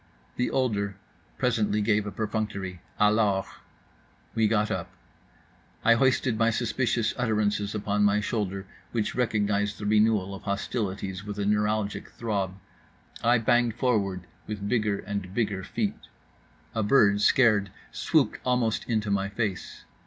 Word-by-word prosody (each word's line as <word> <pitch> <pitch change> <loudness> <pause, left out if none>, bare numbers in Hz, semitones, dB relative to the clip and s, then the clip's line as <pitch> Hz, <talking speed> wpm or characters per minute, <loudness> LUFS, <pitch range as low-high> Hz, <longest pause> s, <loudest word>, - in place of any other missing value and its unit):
The 125 - 0
older 100 -6 0 0.4
presently 110 -4 +1
gave 105 0 +1
a - - -4
perfunctory 100 -3 -3 0.2
"alors"; 105 -2 +3 0.9
we 115 -2 +3
got 105 -1 +1
up; - - -3 1.0
I 115 - +7
hoisted 130 -2 +2
my 115 0 +4
suspicious 115 0 0
utterances 105 -3 0
upon 105 0 0
my 105 0 +4
shoulder, 100 -3 -2 0.3
which 110 -3 -1
recognized 105 -4 0
the 105 - -6
renewal 105 -2 +3
of 95 - -8
hostilities 100 -2 -3
with 105 -1 -6
a 100 - -1
neuralgic 105 0 0
throb. 100 -5 -2 0.7
I 120 +1 +5
banged 120 0 +2
forward 100 -8 0 0.3
with 105 -1 -4
bigger 105 -3 +1
and 100 -2 -5
bigger 105 -5 -1
feet. - - -3 0.7
A 110 - 0
bird, 105 -2 +4
scared, 105 -6 +4 0.2
swooped - - +1
almost 125 -3 0
into 110 -3 0
my 100 0 0
face. 100 -2 -4
105 Hz, 130 wpm, -27 LUFS, 100-115 Hz, 1.0 s, I